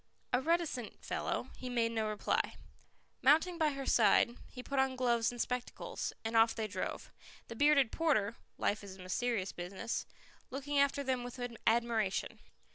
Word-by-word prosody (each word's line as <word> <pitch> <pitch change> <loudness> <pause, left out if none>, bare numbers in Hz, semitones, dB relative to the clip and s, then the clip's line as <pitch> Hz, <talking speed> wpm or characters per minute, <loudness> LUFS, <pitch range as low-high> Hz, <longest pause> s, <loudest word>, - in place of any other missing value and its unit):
A 250 - +3
reticent 320 -7 -1
fellow, - - -2
he 255 - -6
made 235 -2 +1
no 220 -1 0
reply. 210 -1 0 0.7
Mounting 325 +5 +4
by 310 -1 +4
her 275 -1 -5
side, 235 +1 +4
he 250 - -9
put 275 0 -1
on 265 -1 +2
gloves 235 -3 +2
and 240 - -9
spectacles, 250 +1 -3
and 225 +1 -2
off 225 0 +5
they 220 - -2
drove, 215 - -4 0.4
the 230 - -6
bearded 285 -2 +4
porter 235 -10 +1 0.2
life 210 0 0
is 195 -2 -8
a - - -16
mysterious 195 +1 -1
business 185 +5 -4 0.4
looking 280 +2 -1
after 280 0 +3
them 255 -2 0
with 245 +1 -7 0.3
admiration. 225 -3 +1
245 Hz, 160 wpm, -34 LUFS, 225-275 Hz, 0.7 s, off